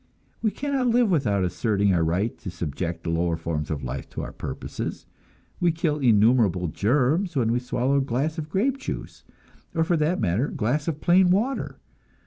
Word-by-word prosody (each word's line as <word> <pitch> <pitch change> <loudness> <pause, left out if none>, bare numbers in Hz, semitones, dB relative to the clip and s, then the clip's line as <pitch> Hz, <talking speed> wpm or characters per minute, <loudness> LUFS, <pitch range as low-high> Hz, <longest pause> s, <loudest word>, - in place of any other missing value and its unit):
We 220 - +2
cannot 270 +4 -1
live 235 -3 +3
without 105 - +2
asserting 100 +1 +1
our 85 -2 +2
right 90 +8 0
to 95 - -6
subject 85 0 -4
the 85 - -2
lower 85 0 0
forms 80 -2 -3
of 75 -3 -3
life 65 +2 -5
to - - -5
our - - -6
purposes; - - -6 0.5
we 175 -1 +3
kill 160 -2 -1
innumerable 110 - +3
germs 145 - +1
when 115 -4 +2
we 120 - +2
swallow 125 +2 0
a - - +3
glass 140 +5 -1
of 155 0 -5
grape 255 - 0
juice, - - -6 0.5
or 165 - +3
for 170 0 +1
that 155 +4 +1
matter 105 +5 +1
a - - -7
glass 140 +8 0
of 155 -2 -2
plain 180 +1 +5
water. 225 +9 0
125 Hz, 185 wpm, -25 LUFS, -, 0.5 s, plain